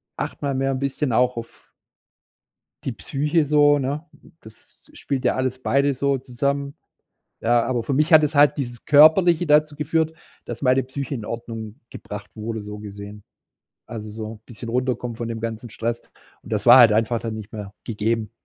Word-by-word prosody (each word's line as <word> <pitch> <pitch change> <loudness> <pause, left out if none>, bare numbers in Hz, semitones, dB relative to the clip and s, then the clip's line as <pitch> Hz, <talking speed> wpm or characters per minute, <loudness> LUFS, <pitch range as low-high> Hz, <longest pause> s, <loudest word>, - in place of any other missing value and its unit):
achte - - -4
mal 140 -1 -1
mehr 135 +1 0
'n 130 - -2
bisschen 140 0 -2
auch 125 +2 +2
auf 115 0 -9 1.2
die - - -2
Psyche 150 +3 -1
so," 145 0 +4
ne? 140 +4 -3 0.4
Das 110 0 -17 0.2
spielt 135 -2 -4
ja - - +2
alles 130 -1 -2
beide 140 +2 +2
so 140 +1 +1
zusammen. 140 +3 -2 0.7
Ja, 120 0 +2
aber 120 -1 -1
für 140 - -2
mich 155 +5 +1
hat 155 -1 +8
es 150 0 0
halt 145 +1 +5
dieses 120 -4 -5
Körperliche 160 +4 +6
dazu 150 0 +3
geführt, 160 +2 -1 0.3
dass 120 -1 -7
meine 130 0 +3
Psyche 135 +2 -5
in 110 - -7
Ordnung 115 +1 -7
gebracht 105 0 -9
wurde, 110 0 -5
so 105 0 -8
gesehen. 105 0 -10 0.6
Also, 110 -2 -7
so 110 0 -7
bisschen 115 0 -9
runterkommen 125 -1 -2
von 115 0 -4
dem 115 -1 -5
ganzen 115 +1 -5
Stress. 115 +2 -3 0.4
Und - - -11
das - - -1
war 120 +2 +10
halt 115 -3 +8
einfach 115 +2 +1
dann 115 -1 -4
nicht 110 -1 -9
mehr 105 -2 -8
gegeben. 110 0 -2
125 Hz, 180 wpm, -22 LUFS, 115-140 Hz, 1.2 s, war